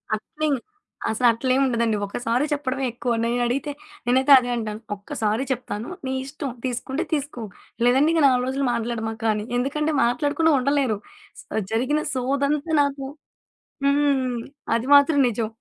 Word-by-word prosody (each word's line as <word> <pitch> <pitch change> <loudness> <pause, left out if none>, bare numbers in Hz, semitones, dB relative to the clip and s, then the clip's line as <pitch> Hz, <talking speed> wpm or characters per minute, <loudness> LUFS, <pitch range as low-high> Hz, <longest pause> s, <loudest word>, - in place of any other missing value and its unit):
అట్లిం 300 +7 -2 0.6
అసలు 225 +3 +2
అట్లేముండదండి. 235 -2 +1
ఒక్క 200 - -6
సారి 240 +5 +2
చెప్పడమే 270 -2 -2
ఎక్కువ. 240 +1 -3
నేనడిగితే 245 +4 0 0.3
నేనైతే 260 +3 +3
అదే 245 -1 0
అంటాను. 215 -2 -4 0.2
ఒక్క 200 0 -9
సారి 215 +4 +1
చెప్తాను. 235 -3 -4 0.2
నీ 260 - -2
ఇష్టం 280 +1 -5 0.2
తీసుకుంటే 260 +4 -2
తీసుకో. 285 -5 -2 0.4
లేదంటే 265 +5 +4
ఇంక 325 -2 +3
4 250 -1 +2
రోజులు 270 +1 -1
మాట్లాడమాక 225 -1 -3
అని. 210 0 -4
ఎందుకంటే 300 +5 0
మాట్లాడకుండా 290 +6 +2
ఉండలేరు. 270 -4 +1 0.4
సో, - - -20 0.3
జరిగిన 260 +7 +1
సోదంతా 280 +4 0
నాకు 280 -1 -1 0.8
హ్మ్. 280 -4 +2 0.3
అది 235 +2 -2
మాత్రం 285 +1 +5
నిజం. 230 -1 -1
260 Hz, 135 wpm, -23 LUFS, 235-285 Hz, 0.8 s, మాత్రం